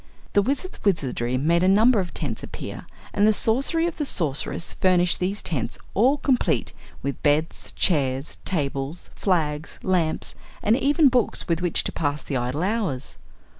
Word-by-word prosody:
The 205 - +5
Wizard's 280 - -3
wizardry 130 - 0
made 165 +6 +2
a 185 - +3
number 215 +4 +5
of 180 -2 -3
tents 130 -8 -4
appear - - -8 0.3
and 205 +1 +3
the - - +6
sorcery 275 +11 +2
of 345 - -3
the 295 - -1
Sorceress 155 - 0
furnished 180 -2 +2
these 195 +3 -1
tents 130 -6 -2 0.2
all 255 +8 +3
complete, 265 -3 0 0.3
with 140 0 -4
beds, 150 +2 0
chairs, 135 -5 0
tables, 140 -1 -2
flags, 155 -5 -1
lamps 175 -4 0 0.3
and 215 - +4
even 285 +4 +3
books 250 -3 +2
with 170 0 0
which 175 -2 +2
to - - -3
pass 145 -1 -3
idle 130 +4 -1
hours. 190 - -2
175 Hz, 155 wpm, -24 LUFS, 145-215 Hz, 0.3 s, the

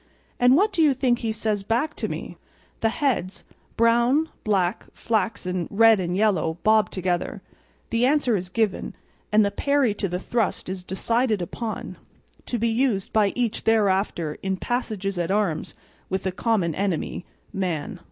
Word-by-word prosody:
And 245 +1 +6
what 410 +3 +2
do 345 - +2
you 295 -4 +4
think 250 -2 +1
he 225 -2 -1
says 215 -2 -1
back 235 +9 0
to - - -2
me?" - - -6 0.4
The 225 - +2
heads, 225 -8 -1 0.3
brown, 240 +7 +3
black, 195 -2 0
flaxen, 185 -5 -1
red, 225 0 +5
and 180 0 -1
yellow 180 -6 +1
bob 215 -3 +4
together; 180 -2 -2 0.5
the 230 +2 +3
answer 275 -5 +2
is 180 -2 -3
given; 215 0 -1 0.4
and 210 0 +5
the 200 - 0
parry 280 0 +1
to 200 -2 -3
the 180 - -2
thrust 220 0 -1
is 185 -1 -5
decided 225 +4 0
upon, 215 +6 -5 0.5
to 245 - -1
be 230 +1 +1
used 225 -4 0
by 210 -2 +3
each 240 -3 -1
thereafter 195 -7 +1
in 190 -1 -1
passages 205 -5 -2
at 170 0 -1
arms 195 -5 -1 0.3
with 190 0 -2
the 190 - -1
common 190 -4 0
enemy, 185 -1 -2 0.3
man. 185 +1 -3
215 Hz, 160 wpm, -24 LUFS, 185-235 Hz, 0.5 s, And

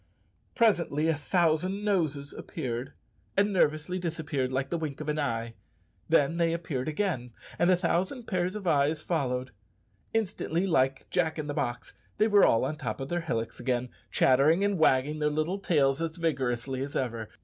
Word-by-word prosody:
Presently 170 - +2
a - - +4
thousand 175 +5 +1
noses 155 -8 0
appeared, 125 -5 -5 0.4
and 200 +1 +3
nervously 155 +1 +1
disappeared, 155 -6 -2
like 130 +1 -2
the 170 - 0
wink 150 -4 -4
of 155 -1 -4
an 150 +1 0
eye. 115 -4 -2 0.6
Then 160 0 +3
they 165 -1 +2
appeared 155 -6 -3
again, 150 - -2 0.3
and 175 - +4
a 185 - +5
thousand 185 +8 0
pair 185 -5 0
of 195 +1 -6
eyes 150 -1 +2
followed. 130 -6 -1 0.6
Instantly, 190 -5 -1
like 135 -7 +1
Jack 160 -3 +1
in 155 - -3
the 145 - -3
box, 120 -3 -3 0.2
they 215 - +4
were 205 -2 +5
all 115 - +3
on 150 +3 -3
the - - -22
top 130 - -4
of 135 +1 -5
their 175 0 -1
hillocks 115 -9 -3
again, 125 -1 -1 0.2
chattering 145 +8 +4
and 200 -3 +1
wagging 150 0 +3
their 150 0 +2
little 155 +6 -1
tails 145 -6 +2
as 165 0 -3
vigorously 130 -5 -1
as 140 +1 -5
ever. 115 -4 -2
155 Hz, 175 wpm, -28 LUFS, 135-175 Hz, 0.6 s, a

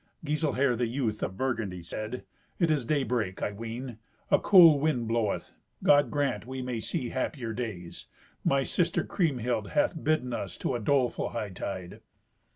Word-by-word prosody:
Giselher, 145 -4 +1
the 120 0 0
youth, 115 -3 -2
of 95 - -3
Burgundy, 110 -9 -2
said, 110 +8 -5 0.3
"It 170 -3 +2
is 145 -6 +1
daybreak, 125 -10 0
I - - 0
ween. 115 +3 -6 0.3
A 195 - +6
cool 170 -7 +8
wind 140 -6 0
bloweth. 115 -3 -1 0.3
God 145 -3 +5
grant 145 -4 -1
we 130 0 -5
may 125 -2 -3
see 120 +2 -3
happier 130 -3 -3
days. 105 -8 -6 0.4
My 135 0 +2
sister 170 +4 0
Kriemhild 125 - -1
hath 155 +1 +1
bidden 150 -5 +1
us - - -4
to - - -2
a 120 - -1
doleful 130 +1 +1
hightide." 95 -4 -5
125 Hz, 155 wpm, -29 LUFS, 110-145 Hz, 0.4 s, cool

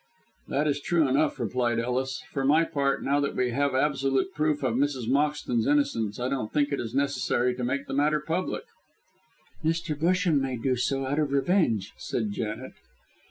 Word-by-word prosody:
"That 150 +2 0
is 145 -1 0
true 165 -1 +2
enough," 145 +4 +1
replied 120 -2 0
Ellis. 125 +2 -2
"For 135 - -2
my 150 +5 +4
part, 140 -3 0
now 140 +1 +2
that 140 -1 -1
we 125 -1 +1
have 140 +2 0
absolute 135 +4 +1
proof 150 -3 0
of 125 -3 +1
Mrs. 130 -2 0
Moxton's 140 -4 +1
innocence, 135 -8 +1
I 125 - -1
don't 130 -5 -2
think 145 -1 +1
it 140 - -1
is 115 0 -5
necessary 130 -3 +1
to 125 0 -5
make 140 +3 -1
the - - -6
matter 150 +2 +2
public." 165 +5 -2 1.0
"Mr. 165 0 0
Busham 170 0 +2
may 130 -2 -2
do 130 +2 0
so, 135 +2 -1
out 140 +3 -1
of 150 -2 0
revenge," 135 - +1
said 110 -4 -2
Janet. 110 +4 -4
140 Hz, 180 wpm, -27 LUFS, 125-150 Hz, 1.0 s, my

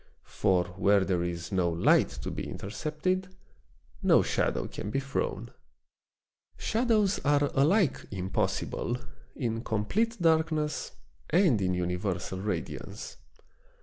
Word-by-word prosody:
For 95 -3 +3 0.2
where 100 -1 +4
there 90 -2 +1
is 85 -1 -4
no 90 -3 +2
light 85 0 +4
to - - -3
be - - -5
intercepted, 185 - -3 0.7
no - - +5
shadow - - 0
can - - -6
be 135 - 0
thrown. 135 +1 -3 1.1
Shadows 220 -4 +2
are 145 0 +3
alike 160 - +2
impossible 95 +5 -1 0.4
in 115 -3 -2
complete 215 - 0
darkness 160 -2 +1 0.4
and 165 - +4
in 90 -1 +1
universal 90 +1 -2
radiance. 105 +2 -5
125 Hz, 110 wpm, -29 LUFS, -, 1.1 s, no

